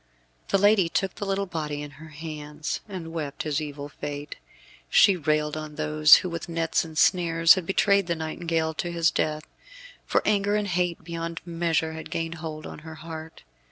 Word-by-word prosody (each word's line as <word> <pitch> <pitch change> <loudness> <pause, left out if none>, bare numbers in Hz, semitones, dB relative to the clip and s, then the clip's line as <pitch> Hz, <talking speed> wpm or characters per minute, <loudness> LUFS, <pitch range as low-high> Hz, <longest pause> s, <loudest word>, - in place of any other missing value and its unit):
The - - +3
lady 200 -3 +4
took 190 +2 -1
the 205 - -5
little 195 0 0
body 150 -5 -4
in 145 - -8
her 160 - -10
hands, 150 -1 -5
and 170 -4 -6
wept 145 -4 -4
his 150 -1 -1
evil 145 -1 -6
fate. 145 0 -6 0.5
She 200 - +6
railed 150 -2 0
on 155 -1 -6
those 155 0 +6
who - - -1
with 170 0 -5
nets 165 -1 0
and 160 -2 -9
snares 165 -1 +5
had 185 -4 -3
betrayed 200 -1 +3
the 170 - 0
nightingale 160 0 -2
to 175 +2 -3
his 170 -1 +2
death; 155 0 -1 0.6
for - - +1
anger 205 0 +2
and 210 -1 0
hate 175 -2 -1
beyond 165 0 -5
measure 165 -2 0
had 160 - -8
gained 165 0 -2
hold 155 -2 -6
on - - -8
her 160 +1 -10
heart. 160 0 -9
165 Hz, 185 wpm, -26 LUFS, 155-175 Hz, 0.6 s, She